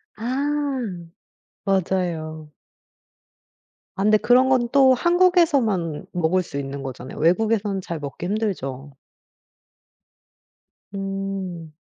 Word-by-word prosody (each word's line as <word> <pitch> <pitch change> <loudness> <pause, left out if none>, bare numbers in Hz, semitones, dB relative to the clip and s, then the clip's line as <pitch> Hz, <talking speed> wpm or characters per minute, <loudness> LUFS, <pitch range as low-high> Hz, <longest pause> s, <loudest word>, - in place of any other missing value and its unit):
아. 275 +4 -1 0.9
맞아요. 170 -5 -1 1.5
아 195 - 0
근데 215 +1 +5
그런 255 +4 +4
건 250 -2 +3
또 265 -2 +6
한국에서만 285 - +2
먹을 180 +2 +1
수 140 - -7
있는 140 0 -5
거잖아요. 130 0 -7
외국에서는 200 +4 +1
잘 170 -3 -5
먹기 145 +4 -6
힘들죠? 145 - -3 2.0
음. 195 -4 -5
195 Hz, 185 characters per minute, -23 LUFS, 160-245 Hz, 2.0 s, 또